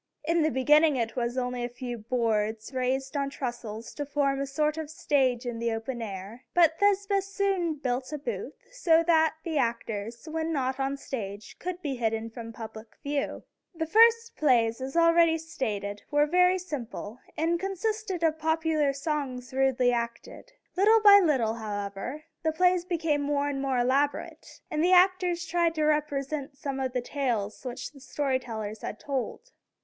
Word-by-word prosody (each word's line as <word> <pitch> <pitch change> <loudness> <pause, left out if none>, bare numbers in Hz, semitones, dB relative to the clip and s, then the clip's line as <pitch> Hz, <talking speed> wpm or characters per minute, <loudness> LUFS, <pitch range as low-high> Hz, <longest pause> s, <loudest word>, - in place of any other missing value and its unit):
In 335 +2 +2
the 310 - +3
beginning 295 +4 +4
it 230 -2 -2
was 240 0 -2
only 250 -1 -2
a 240 - -2
few 245 -1 -6
boards 220 0 -1
raised 260 +2 -1
on 280 -1 0
trestles 240 -5 -6
to 290 - -3
form 275 -1 0
a 275 - -2
sort 300 +2 0
of 315 -2 -5
stage 265 -5 +1
in 240 -2 -4
the 235 0 0
open 225 +2 -4
air; 205 +3 -7
but 330 -2 +4
Thespis 400 -1 +2
soon 390 -5 0
built 255 -2 -2
a 300 - -3
booth, 300 +11 -5 0.2
so 335 -10 +3
that 320 -1 +3
the 320 -3 -1
actors, 230 0 -3
when 320 +1 -2
not 265 -3 -1
on 270 0 0
the - - -5
stage, 205 -7 -6
could 365 0 -5
be 275 -4 -2
hidden 225 -1 -1
from 230 -1 -8
public 220 -1 -10
view. 285 0 -2 0.3
The 320 0 -1
first 460 +5 +5
plays, 235 -5 +2
as 270 +5 -4
already 335 -1 +5
stated, 215 -11 -4
were 295 0 +3
very 360 +3 +4
simple, 250 - -6 0.2
and 335 +2 +1
consisted 390 -1 -2
of 320 -1 +2
popular 320 -2 +1
songs 275 -4 -3
rudely 260 -2 +3
acted. 235 - -4 0.2
Little 425 +4 +5
by 405 -1 +9
little, 255 -9 +2
however, 210 +5 -5 0.2
the 315 - +1
plays 360 +2 +2
became 325 -5 0
more 285 0 0
and 275 -1 -3
more 270 -2 0
elaborate, 270 +4 -1
and 310 +1 0
the 365 +2 +4
actors 360 -1 +4
tried 340 -1 +1
to 310 - 0
represent 290 -2 -1
some 275 -1 -4
of 260 -1 -2
the 250 - 0
tales 240 -6 -2
which 250 0 -5
the 280 - -15
story 270 -1 -1
tellers 220 -3 -6
had 215 - -5
told. 285 - -4
280 Hz, 175 wpm, -28 LUFS, 240-325 Hz, 0.3 s, by